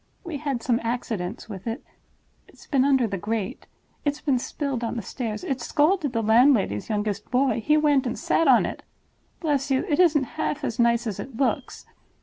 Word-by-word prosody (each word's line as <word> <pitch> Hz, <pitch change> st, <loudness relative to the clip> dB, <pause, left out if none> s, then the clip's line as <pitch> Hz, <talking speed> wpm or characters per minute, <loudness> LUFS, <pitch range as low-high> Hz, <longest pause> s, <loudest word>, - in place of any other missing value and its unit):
We 340 Hz, -5 st, -5 dB
had 275 Hz, -5 st, -3 dB
some 240 Hz, -2 st, +2 dB
accidents 225 Hz, -4 st, -3 dB
with 200 Hz, -1 st, -8 dB
it. 230 Hz, +4 st, -3 dB, 0.6 s
It's -, -, -18 dB
been 270 Hz, -3 st, +2 dB
under 265 Hz, -3 st, +3 dB
the 200 Hz, -3 st, -3 dB
grate. 220 Hz, +5 st, -3 dB, 0.4 s
It's 290 Hz, 0 st, -1 dB
been 275 Hz, -4 st, +1 dB
spilled 270 Hz, -1 st, -3 dB
on 230 Hz, -, -2 dB
the 230 Hz, -, -4 dB
stairs. 215 Hz, 0 st, -4 dB
It's 265 Hz, -3 st, -3 dB
scalded 300 Hz, -2 st, +2 dB
the 230 Hz, -1 st, 0 dB
landlady's 220 Hz, -, +3 dB
youngest 210 Hz, -1 st, -2 dB
boy—he 265 Hz, +2 st, +2 dB
went 290 Hz, -3 st, +3 dB
and -, -, -3 dB
sat 330 Hz, -, +1 dB
on 255 Hz, -3 st, +6 dB
it. -, -, -5 dB, 0.6 s
Bless 290 Hz, -4 st, 0 dB
you, 265 Hz, +3 st, +1 dB
it 300 Hz, -3 st, 0 dB
isn't 315 Hz, -6 st, +5 dB, 0.2 s
half 300 Hz, 0 st, -2 dB
as 235 Hz, -4 st, -3 dB
nice 235 Hz, 0 st, +3 dB
as 215 Hz, -4 st, -4 dB
it 260 Hz, -4 st, -7 dB
looks! 270 Hz, -, -1 dB
250 Hz, 185 wpm, -25 LUFS, 225-285 Hz, 0.6 s, on